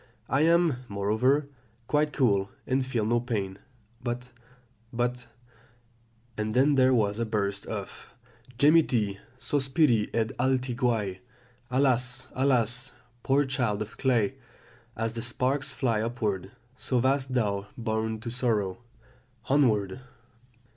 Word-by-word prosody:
I 135 +3 +2
am, 165 -3 +4
moreover, 110 +8 +1 0.4
quite 150 +3 +1
cool, 100 -9 +2 0.2
and 130 +1 +1
feel 120 -4 -1
no 120 +2 +2
pain 100 -5 -3 0.4
but 125 +1 -4 0.6
but 125 0 -2 1.1
"And 110 0 -2
then 135 +4 +4
there 130 -1 +5
was 105 -3 +2
a - - +1
burst 100 -1 -2
of - - -7 0.5
'gemiti, 125 -9 +3 0.2
sospiri 130 -2 +2
ed 110 -1 0
alti 130 0 +1
guai.' 115 -7 0 0.5
Alas, 130 -1 +1
alas, 125 -1 +1 0.3
poor 140 +3 +2
child 120 -6 0
of 105 - -14
clay! 130 -2 +1 0.6
as 115 0 -2
the 115 - -4
sparks 130 +3 0
fly 115 -5 0
upward, 110 -5 -2 0.3
so 130 0 -1
wast 130 +1 +1
thou 100 -4 0
born 110 -1 -2
to 115 0 -5
sorrow 110 -6 0 0.7
Onward!" 120 -6 +2
120 Hz, 120 wpm, -28 LUFS, 110-130 Hz, 1.1 s, there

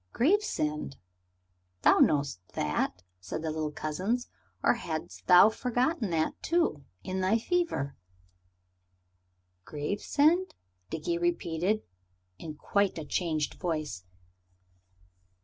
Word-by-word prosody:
"Gravesend, 230 - +1 0.9
thou - - +6
knowest 140 -9 +3 0.2
that," 80 +4 -1 0.2
said 95 - -5
the 160 - -1
little 155 -1 -2
cousins, 185 - -2 0.3
"or - - +5
hadst 160 -9 -6
thou 180 +3 +9
forgotten 250 - 0
that, 160 -2 -1
too, 335 - +1 0.2
in 185 0 -2
thy 190 +4 +3
fever?" 235 - -1 1.7
"Gravesend?" 285 - +1 0.3
Dickie 345 -1 -2
repeated, 210 - 0 0.6
in 155 -2 -7
quite 200 +4 0
a 155 - -5
changed 155 -2 -1
voice. 155 - -3
180 Hz, 95 wpm, -29 LUFS, 150-245 Hz, 1.7 s, thou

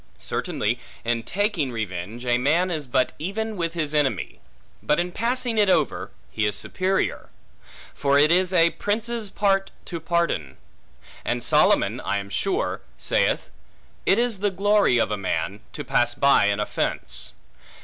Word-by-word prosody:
Certainly, - - -2 0.3
in 115 0 +1
taking 195 - -1
revenge, 110 +1 -5
a 120 0 +2
man 165 +8 +2
is 155 -5 -3
but 130 0 +1
even 215 +6 -3
with 170 -3 -2
his 155 -3 -1
enemy; 135 - 0 0.4
but 150 +2 +2
in 175 +1 -1
passing 240 +1 0
it 205 -2 +4
over, - - +1 0.2
he 110 -1 0
is 105 - -1
superior; 190 - -1 0.6
for 140 0 +2
it 150 +2 +5
is 180 +1 +3
a 170 -2 +5
prince's 220 +1 -2
part 195 -1 +1 0.2
to 170 - -5
pardon. 165 - -1 0.7
And - - -1
Solomon, - - +3
I 100 - -1
am 100 0 -6
sure, 95 - -1 0.2
saith, - - 0 0.6
It 195 - +5
is 235 -4 +1
the 205 +1 +2
glory 200 -7 +3
of 115 - +1
a 105 - 0
man, 100 +1 -2
to - - -5
pass 120 0 +1
by 140 -5 +5
an 100 0 +1
offence. 60 -11 -2
165 Hz, 155 wpm, -24 LUFS, 120-195 Hz, 0.7 s, it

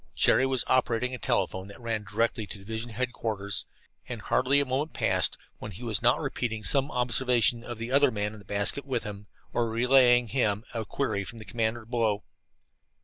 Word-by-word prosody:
Jerry 130 - +4
was 130 -2 0
operating 125 0 +1
a 125 - -5
telephone 95 -3 -1
that 100 - -12
ran 115 -3 -3
directly 110 +2 -1
to 105 - -8
division 110 +4 -5
headquarters, 110 -4 -2 0.4
and - - -5
hardly 135 +3 +2
a 140 - +1
moment 140 +4 -2
passed - - +2 0.2
when - - -7
he 110 - -9
was 110 -4 0
not - - +4
repeating 110 -3 -3
some 140 +4 +3
observation 125 -1 +2
of 120 -2 -6
the 115 +2 -5
other 140 +1 +5
man 105 -2 -2
in 110 - -11
the 100 - -16
basket 100 +7 0
with 130 -3 -2
him, 105 -1 -8 0.3
or 120 -1 0
relaying 125 +1 +5
to - - -8
him 105 -5 +1
a 115 -2 -3
query 100 -7 -2
from 115 - -9
the 110 - -10
commander 110 +2 -2
below. 110 -3 0
115 Hz, 195 wpm, -28 LUFS, 105-125 Hz, 0.4 s, other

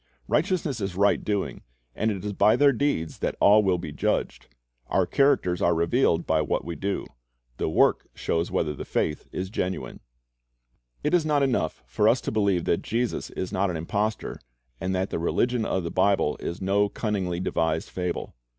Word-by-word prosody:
Righteousness 155 - 0
is 95 -2 -3
right 100 +2 +3
doing, 105 -2 -2 0.3
and 110 - 0
it 100 -2 -4
is 105 - -2
by 105 - +4
their 145 -1 +5
deeds 120 - -1
that - - -1
all 105 +2 +6
wi'.l 95 -3 +2
be 85 -4 -6
judged. - - -1 0.4
Our - - +2
characters 135 -11 +2
are 85 0 +3
revealed 85 0 +2
by 80 -1 +2
what - - -1
we 85 0 -4
do. 100 +6 -2 0.5
The - - -1
works - - +3
show 80 - 0
whether 85 -5 -1
the - - -6
faith 75 - -2
is 95 +1 -4
genuine. 95 -2 -3 1.0
It - - 0
is 175 -2 +4
not 150 -2 +2
enough 120 - 0
for - - +2
us - - +3
to - - -3
believe 100 -5 +1
that 85 - +1
Jesus 120 +1 -2
is 95 - -5
not 95 +1 +1
an 85 - -2
impostor, 105 +7 -2 0.4
and 95 0 -1
that 95 +1 -1
the - - -1
religion 120 +7 +1
of 95 - -1
the 85 - -4
Bible 95 -5 +2
is 85 +3 -5
no 100 +2 +2
cunningly 95 -5 -2
devised 80 -2 -1
fable. 90 -1 -3
95 Hz, 185 wpm, -26 LUFS, 85-110 Hz, 1.0 s, all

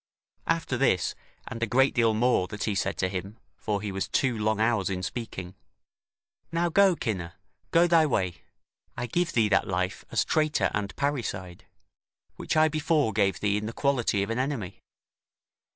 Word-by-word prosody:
After 165 -6 0
this, 110 -9 +2 0.3
and 115 - -6
a 115 - +1
great 135 +5 +3
deal 115 -2 +3
more 120 -5 +2
that 105 +1 -5
he 105 - 0
said 100 0 -1
to 95 - +1
him 95 +3 -5 0.2
(for 105 -1 -3
he 105 - -3
was 95 0 -2
two 130 -3 +1
long 110 0 0
hours 110 -4 +2
in 90 -1 -3
speaking), 95 -5 -5 1.0
"Now 170 +1 +1
go, 195 +1 +5
Cinna, 95 - -4 0.3
go 170 +1 +5
thy 165 -2 +4
way: 95 - -1 0.6
I - - -2
give 170 +8 -1
thee 115 -3 +3
that - - +2
life 90 0 -2
as - - +1
traitor 155 -1 +1
and 100 -1 -3
parricide, 110 -11 -3 0.7
which - - -2
I 155 0 +6
before 155 -6 +1
gave 100 -1 +1
thee 105 -1 +1
in 105 +1 -3
the 115 - -5
quality 120 -8 +1
of 100 - -4
an 115 - -1
enemy. 130 -9 -3
110 Hz, 175 wpm, -27 LUFS, 100-140 Hz, 1.0 s, I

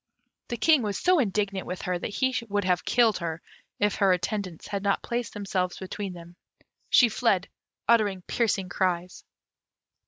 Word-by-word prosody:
The 240 - -3
King 310 +4 +4
was 205 -3 -2
so 365 -2 +3
indignant 200 -4 -1
with 180 - -5
her 180 -1 -1
that - - -3
he 260 +5 0
would 205 0 0
have 180 -1 +1
killed 230 -5 +3
her, 165 -2 -3 0.4
if 205 0 +1
her 195 -2 +4
attendants 180 -1 -2
had 200 -1 -3
not 200 0 0
placed 240 -2 -3
themselves 185 -3 -2
between 190 0 -5
them. 175 0 -12 0.5
She 245 - +6
fled, 210 -4 +1 0.4
uttering 205 -5 +3
piercing 205 -4 0
cries. 180 -1 -1
200 Hz, 160 wpm, -27 LUFS, 180-220 Hz, 0.5 s, She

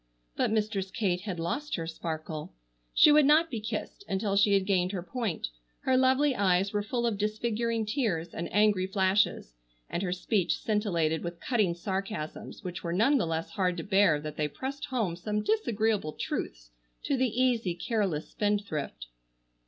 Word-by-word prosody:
But - - +1
Mistress 210 -3 0
Kate 185 -3 0
had 190 -4 -4
lost 280 - -2
her 165 - -3
sparkle. 160 - -5 0.4
She 300 - +7
would 300 0 +7
not 320 +3 +5
be 230 - -2
kissed 215 - -5
until 195 +1 0
she 200 0 +5
had 195 -1 +2
gained 185 -1 +1
her 180 -3 -3
point, 215 - -3 0.3
her 260 - +2
lovely 260 +2 +4
eyes 195 -2 +2
were 205 - +1
full 235 +3 -2
of 220 -4 0
disfiguring 225 +1 -1
tears 210 - -1
and 170 - -4
angry 205 -3 +3
flashes, 190 - +1 0.4
and 175 - -1
her 185 -2 -1
speech 185 +1 0
scintillated 170 -7 0
with 170 -1 -5
cutting 210 -9 +1
sarcasms, 190 -2 -5
which 180 -1 -5
were 170 -1 -2
none 265 +10 +4
the 170 - 0
less 165 0 -2
hard 185 -3 0
to 165 - -3
bear 195 -6 +4
that 150 0 -7
they 150 - +1
pressed 270 - -5
home 220 -10 -1
some 210 +4 -2
disagreeable 220 - +1
truths - - -4 0.3
to 280 - +1
the 260 -1 +2
easy, 235 -8 +2
careless 185 -5 -1
spendthrift. 200 - -2
200 Hz, 170 wpm, -29 LUFS, 175-225 Hz, 0.4 s, She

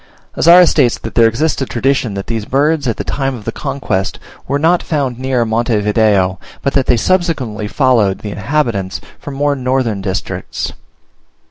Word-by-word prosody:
Azara 175 +2 +7
states 135 -8 +2
that 115 - -7
there 115 -1 +5
exists 135 +7 0
a - - +1
tradition 125 -3 0
that 100 - -4
these 110 -2 -3
birds, 145 +2 +1
at 115 - -1
the - - -3
time 135 -1 -2
of 110 -4 -10
the 115 - -2
conquest, 135 -8 -3 0.3
were 140 - 0
not 165 +4 +2
found 135 -6 -2
near 130 -2 0
Monte 115 0 0
Video, 105 -3 +2 0.2
but 140 - 0
that 135 -2 +1
they 120 - +4
subsequently 130 - 0
followed 115 -6 +2
the 105 - -5
inhabitants 105 -4 -1 0.2
from 145 - -8
more 145 +1 +1
northern 125 -5 -1
districts. 95 -1 -4
125 Hz, 170 wpm, -15 LUFS, 110-140 Hz, 0.3 s, Azara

